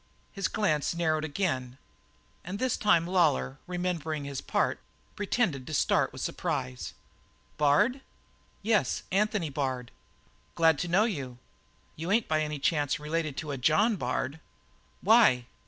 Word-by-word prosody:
His 195 -3 -1
glance 170 -7 0
narrowed 155 -2 +1
again, 145 -6 -2 0.7
and 185 +3 -5
this 255 +2 0
time 170 -5 +3
Lawlor, 70 - +1
remembering 170 -4 -2
his 140 -1 -4
part, - - 0 0.4
pretended 195 - -1
to 155 - -3
start - - +2
with - - -7
surprise. 65 0 -3 0.6
"Bard?" 150 - +3 0.6
"Yes. 215 -1 +1
Anthony 200 -4 +1
Bard." 130 -3 -3 0.6
"Glad 160 -2 +4
to 180 - -2
know 180 +5 +4
you. 135 - -4 0.6
You 165 +3 -5
ain't 225 +2 +2
by 155 0 +1
any 150 -1 -2
chance 145 0 0
related 155 -1 -2
to 155 -2 -4
a 140 - -3
John 205 - +3
Bard?" 130 0 -2 0.6
"Why?" 210 - +5
160 Hz, 135 wpm, -29 LUFS, 140-195 Hz, 0.7 s, Why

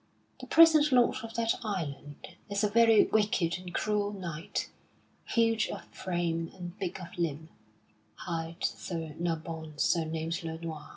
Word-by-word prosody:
The - - -9
present 315 -2 +7
lord 250 0 +4
of 225 -1 -8
that 230 +1 0
island 145 -8 -5 0.2
is 200 +1 0
a 210 - +3
very 225 0 +6
wicked 205 -5 +1
and 180 -1 -8
cruel 205 +2 0
knight, 185 -1 -4 0.5
huge 230 -1 +2
of - - -6
frame 170 -2 -2
and 175 -1 -7
big 190 -1 -3
of 180 - -9
limb, 160 -1 -2 0.7
hight 165 0 -5
Sir 165 -3 -4
Nabon 160 -2 -4
surnamed 165 0 0
le 160 0 -4
Noir. 160 -2 -7
175 Hz, 140 wpm, -30 LUFS, 165-210 Hz, 0.7 s, present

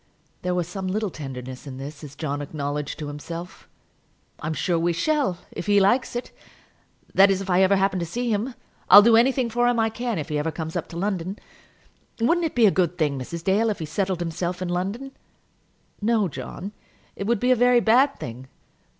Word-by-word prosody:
There 180 0 -1
was 175 -2 -1
some 190 +1 -5
little 205 +1 -1
tenderness 130 -2 -8
in 130 -2 -7
this, 140 +3 -8
as 145 -1 -10
John 145 -2 -3
acknowledged 145 0 -4
to 155 - -5
himself. 165 +4 -8 0.7
"I'm 155 +1 -3
sure 170 0 0
we 170 +1 +1
shall, 270 - +1
if - - -6
he 205 -1 +5
likes 240 +6 +2
it. 240 - -4 0.8
That 195 +1 +7
is, 195 -1 +2
if 195 -1 -4
I 180 +1 +4
ever 190 +1 +5
happen 195 -1 +1
to 170 - -2
see 240 +7 -2
him. 230 +5 -2 0.3
I'll 205 +2 +11
do 230 +1 +6
anything 250 +2 +3
for 240 +1 +1
him 245 -1 +2
I 225 0 +2
can 235 -1 -3
if 150 - -4
he 150 -1 0
ever 155 +2 -1
comes 160 +1 -6
up 175 -1 -2
to 170 - -8
London. 190 0 -2 0.8
Wouldn't 335 +9 +2
it - - -10
be 235 -2 +5
a 200 - +6
good 180 -2 0
thing, 145 -5 0
Mrs. 165 +6 -6
Dale, 205 +5 +2
if 210 - -1
he 160 - -4
settled 185 +3 -2
himself 175 +1 -3
in 185 -1 -3
London?" 200 +10 -3 0.9
"No, 215 -2 +2
John; 185 +5 -7 0.4
it 200 - -4
would 235 -2 +2
be 250 +3 +2
a - - +6
very 245 0 +5
bad 250 +5 +3
thing. 125 +3 -7
185 Hz, 210 wpm, -24 LUFS, 160-225 Hz, 0.9 s, I'll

